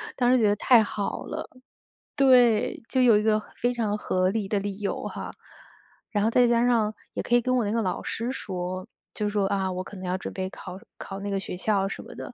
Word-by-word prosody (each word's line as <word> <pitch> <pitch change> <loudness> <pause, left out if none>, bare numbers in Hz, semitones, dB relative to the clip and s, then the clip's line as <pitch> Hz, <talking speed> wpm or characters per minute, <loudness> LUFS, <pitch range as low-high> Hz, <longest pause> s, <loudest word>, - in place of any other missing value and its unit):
当 245 -1 +3
时 255 - +5
觉 215 - +4
得 205 - +3
太 230 +1 +5
好 205 -1 -3
了。 - - -6 0.7
对， 250 -5 +4
就 260 - +2
有 235 -4 +6
一 210 - 0
个 215 -1 +3 0.2
非 245 +1 0
常 215 -3 -1
合 185 -2 +1
理 205 0 -2
的 205 0 0
理 200 0 -5
由 205 - -3
哈。 - - -6 0.8
然 205 -1 +1
后 225 - +2
再 245 0 +5
加 235 0 +3
上， 225 -3 +2 0.2
也 - - -2
可 240 - +2
以 240 - +5
跟 255 +2 +1
我 245 - +2
那 205 - -1
个 230 0 +1
老 185 -3 -2
师 235 +3 -3
说， 185 -5 -5 0.3
就 210 -1 -1
说， 205 -1 0
啊， 190 -1 0
我 185 0 -3
可 205 - -11
能 185 - -7
要 180 +1 -1
准 - - -7
备 190 -1 -3
考 185 -1 -9 0.2
考 195 0 -7
那 200 - -4
个 195 -1 -1
学 190 - -6
校 195 +1 +1
什 195 - -6
么 - - -12
的。 - - -7
跟 245 - -10
210 Hz, 265 characters per minute, -26 LUFS, 195-235 Hz, 0.8 s, 有